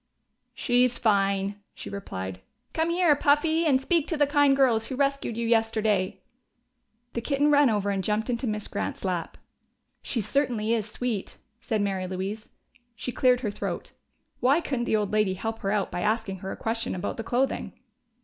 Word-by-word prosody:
"She's 245 0 +2
fine," 200 -1 +1
she - - -8
replied. 95 - -6 0.3
"Come 320 +1 +1
here, 340 -3 +4
Puffy, 315 +3 +3
and 265 -3 +4
speak 325 +3 +1
to 325 - -1
the 290 - +4
kind 285 -1 +4
girls 235 -5 +3
who 260 - -4
rescued 275 -4 0
you 235 0 -1
yesterday!" 220 -4 +1 0.9
The 235 - -2
kitten 285 +4 +2
ran 285 -2 +6
over 205 -2 0
and 195 -1 -1
jumped 210 +3 0
into 245 0 -1
Miss 210 -1 -2
Grant's - - -4
lap. 180 -3 -2 0.6
"She 245 - -2
certainly 230 -2 0
is 220 -2 -1
sweet," 220 -3 -3 0.2
said 220 -3 -1
Mary 190 -2 -1
Louise. 195 +4 -4 0.5
She 250 - -4
cleared 250 +1 +3
her 215 -5 -1
throat: - - -5 0.5
why 270 +6 +4
couldn't 260 -7 -2
the - - +1
old 210 -2 0
lady 210 -3 +2
help 225 +3 -4
her 195 - -2
out 205 -1 0
by 175 - -3
asking 215 -2 -1
her 190 +1 -5
a - - -6
question 225 -1 -2
about 180 - -3
the 225 - -4
clothing? 255 +3 -1
225 Hz, 180 wpm, -27 LUFS, 200-270 Hz, 0.9 s, ran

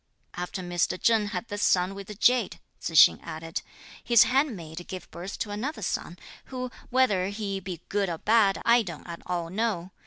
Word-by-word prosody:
"After 180 +1 -5
Mr. 175 +1 0
Cheng 225 -3 +3
had 205 +1 -4
this 205 -1 -4
son 180 0 +3
with 195 -1 -8
the 210 - -8
jade," 240 0 +2 0.2
Tzu 165 - -5
hsing 135 -3 +7
added, 165 +1 -5 0.4
"his 235 -2 +6
handmaid 185 - -1
gave 185 -1 -7
birth 180 +4 -7
to 210 - -4
another 220 +4 -4
son, 175 0 -3 0.3
who 255 -1 -5 0.2
whether 230 -8 +2
he 200 -1 -3
be 180 -3 -7
good 200 -2 0
or 165 - -3
bad, 210 0 +3
I 235 +1 +6
don't 170 -7 -7
at 170 -1 -8
all 170 -2 -2
know. 195 -4 -1
195 Hz, 185 wpm, -27 LUFS, 175-225 Hz, 0.4 s, hsing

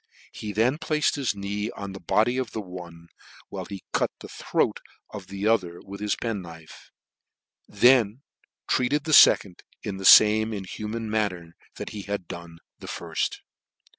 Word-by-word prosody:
He 105 - -6
then 120 +8 +1
placed 155 -3 +1
his 135 -7 -1
knee 100 +2 -3
on 100 -4 -7
the 95 - -8
body 110 +8 +1
of 125 -4 -4
the - - -3
one, 85 -3 -10 0.4
while - - -6
he 100 -2 -8
cut - - +1
the - - -10
throat - - -1 0.3
of 100 -3 -8
the 100 +1 -3
other 90 -6 +1
with 100 +1 -10
his 105 -1 -1
pen 115 -4 -3
knife 80 -2 -13 0.8
j - - -19
and - - -18
then 120 -2 +5 0.5
treated 140 +4 +1
the 155 - -3
fecond 95 -9 +6 0.2
in 100 -2 -4
the 95 - -6
fame 110 +2 +7
in 100 -2 -4
human 110 +4 -5
manner 90 -6 -2 0.2
that - - -6
he 105 - -6
had 100 -3 -5
done 85 -1 -9 0.2
the - - -10
firft. - - -3
105 Hz, 175 wpm, -25 LUFS, 95-115 Hz, 0.8 s, fame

